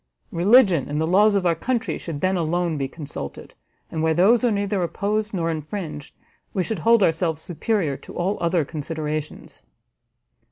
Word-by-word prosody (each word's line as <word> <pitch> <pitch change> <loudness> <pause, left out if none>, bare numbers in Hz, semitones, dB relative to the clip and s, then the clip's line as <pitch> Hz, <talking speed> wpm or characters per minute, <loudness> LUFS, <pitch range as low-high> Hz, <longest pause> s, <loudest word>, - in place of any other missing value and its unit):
Religion 185 - +4
and 150 +1 -1
the 160 - +1
laws 205 +5 +4
of 195 -2 +1
our 170 - +4
country 235 +8 -2
should 155 -4 -6
then 185 +1 +1
alone 170 0 0
be 135 -2 -2
consulted, 140 - -8 0.4
and 160 - -2
where 160 0 +2
those 220 +8 +4
are 245 - +4
neither 200 -2 0
opposed 205 +5 -1
nor 165 -4 -1
infringed, 155 -2 -6 0.4
we 185 - +1
should 215 0 -3
hold 230 +4 +4
ourselves 160 -2 +1
superior 175 - -1
to - - -12
all 185 +4 0
other 170 -2 +1
considerations." 155 0 -5
175 Hz, 165 wpm, -23 LUFS, 155-200 Hz, 0.4 s, Religion